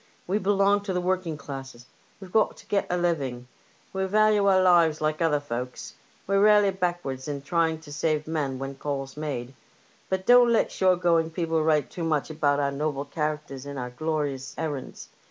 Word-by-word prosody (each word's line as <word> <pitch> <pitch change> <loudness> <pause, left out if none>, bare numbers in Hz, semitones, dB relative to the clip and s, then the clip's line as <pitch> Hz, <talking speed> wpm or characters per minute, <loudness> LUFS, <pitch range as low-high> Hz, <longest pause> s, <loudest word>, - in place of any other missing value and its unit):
We 195 +4 0
belong 200 0 +3
to 190 - -2
the 180 - 0
working 180 -3 -1
classes; 135 -4 -8 0.3
we 190 - -10
have 220 - +3
to - - -16
get 200 - 0
a 180 - 0
living; 140 -8 -1 0.5
we 190 0 -1
value 210 +1 +3
our 190 -1 +5
lives 170 -4 +4
like 155 +1 -1
other 155 -3 +2
folks; 125 -3 -6 0.3
we're 195 +1 +2
rarely 210 -1 +5
backwards 175 -8 -3
in 140 -2 -4
trying 165 +1 +1
to 145 -2 -11
save 150 0 0
men 150 -5 -2
when 135 +1 -4
the 135 - -14
call's 135 -2 -4
made. 135 -5 -4 0.6
But 190 0 -1
don't 245 -1 +6
let 230 - +2
shore 185 -1 +3
going 170 -2 +2
people 165 -1 -1
write 155 -2 +1
too 175 - -5
much 155 -1 0
about 145 -2 +1
our 140 -1 +1
noble 140 0 -2
characters 150 -2 -4
sind 140 +1 -7
our 125 -1 -4
glorious 145 -2 -3
errands. 150 -5 -5
155 Hz, 190 wpm, -26 LUFS, 140-185 Hz, 0.6 s, don't